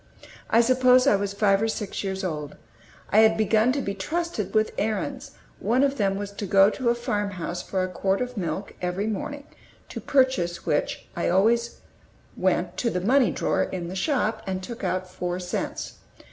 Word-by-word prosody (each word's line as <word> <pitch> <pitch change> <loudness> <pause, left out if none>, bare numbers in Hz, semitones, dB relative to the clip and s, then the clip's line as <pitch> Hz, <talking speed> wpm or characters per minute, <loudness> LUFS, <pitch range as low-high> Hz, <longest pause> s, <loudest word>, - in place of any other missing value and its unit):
I 230 - +5
suppose 255 +1 +5
I 275 - +5
was 200 0 -1
five 200 -1 +2
or 225 - +2
six 215 -3 -4
years 190 0 -3
old. 150 -5 -4 0.6
I 215 - +5
had 220 0 +5
begun 220 +2 +3
to 280 - -1
be 200 - -2
trusted 220 - -3
with 215 0 +3
errands; 215 0 -3 0.3
one 250 +4 +2
of 280 0 +1
them 195 -1 +2
was 200 0 -5
to 200 0 -5
go 195 +2 +5
to 250 0 -1
a 235 - +3
farmhouse 205 -7 -3
for 190 0 -2
a - - -1
quart 190 +1 -1
of 250 0 -3
milk 190 0 -4
every 180 +3 -1
morning, 280 +7 -4 0.4
to - - -6
purchase 255 -11 +1
which 145 - -1
I 170 - -2
went - - +2
always 230 +5 +2 1.0
to 235 - +1
the 180 - -1
money 255 +6 +4
drawer - - 0
in 175 -2 -3
the 185 - -6
shop 225 +1 0
and 190 0 -3
took 235 +2 -7
out 185 0 -1
four 180 0 -4
cents. 180 -1 -4
205 Hz, 190 wpm, -25 LUFS, 185-235 Hz, 1.0 s, I